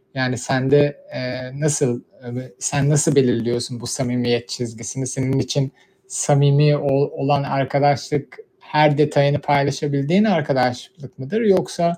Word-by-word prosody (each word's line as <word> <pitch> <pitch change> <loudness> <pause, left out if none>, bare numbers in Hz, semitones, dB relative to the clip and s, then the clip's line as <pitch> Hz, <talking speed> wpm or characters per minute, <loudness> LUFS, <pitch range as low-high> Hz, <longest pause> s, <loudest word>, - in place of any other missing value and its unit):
Yani, 130 -1 -1
sende, 135 - +1
eee, 125 0 -6
nasıl, 145 -5 0 0.2
eee, 120 0 -9
ve 125 -3 -9
sen 140 0 0
nasıl 150 +1 +3
belirliyorsun 120 -1 0
bu 120 - -7
samimiyet 120 -2 -1
çizgisini? 120 +2 -6
Senin 130 +1 -1
için 135 +1 -1 0.4
samimi 145 -2 +3
ol 140 0 +1
olan 140 0 0
arkadaşlık, 140 - -1 0.2
her 150 -1 +2
detayını 145 -1 +2
paylaşabildiğin 145 +5 +1
arkadaşlık 140 - -1
mıdır 135 +13 -3
yoksa 175 -4 +1
140 Hz, 120 wpm, -20 LUFS, 125-145 Hz, 0.4 s, nasıl